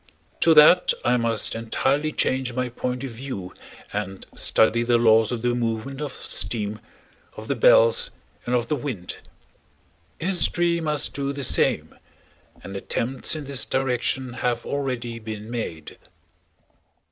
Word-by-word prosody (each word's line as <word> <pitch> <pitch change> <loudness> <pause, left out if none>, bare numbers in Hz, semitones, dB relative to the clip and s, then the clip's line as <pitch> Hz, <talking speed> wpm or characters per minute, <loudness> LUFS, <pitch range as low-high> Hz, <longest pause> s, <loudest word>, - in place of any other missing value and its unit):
To 165 -1 +5
that 155 +4 +7
I 125 - +4
must 115 -3 0
entirely 135 +6 0
change 130 -3 -1
my 125 0 -2
point 125 +1 -4
of 135 - -5
view 115 -6 -7 0.4
and 95 -2 -4
study 115 +1 +3
the 120 0 +3
laws 110 -1 +4
of 120 -2 -4
the 120 0 +1
movement 120 +3 -3
of 150 - -3
steam, 105 0 -3 0.6
of - - -8
the - - +1
bells, - - +5 0.4
and 125 - +1
of 120 -1 0
the 150 - 0
wind. 120 -10 -5 1.0
History 175 -1 +2
must 150 -3 0
do 140 0 -2
the 140 0 -5
same. - - +1 0.7
And 95 - -8
attempts 125 +9 -1
in 155 - -5
this 140 -2 0
direction 130 -1 -1
have 120 -1 -2
already 125 -4 -3
been 110 0 -7
made. 85 -10 -6
125 Hz, 140 wpm, -24 LUFS, 115-140 Hz, 1.0 s, that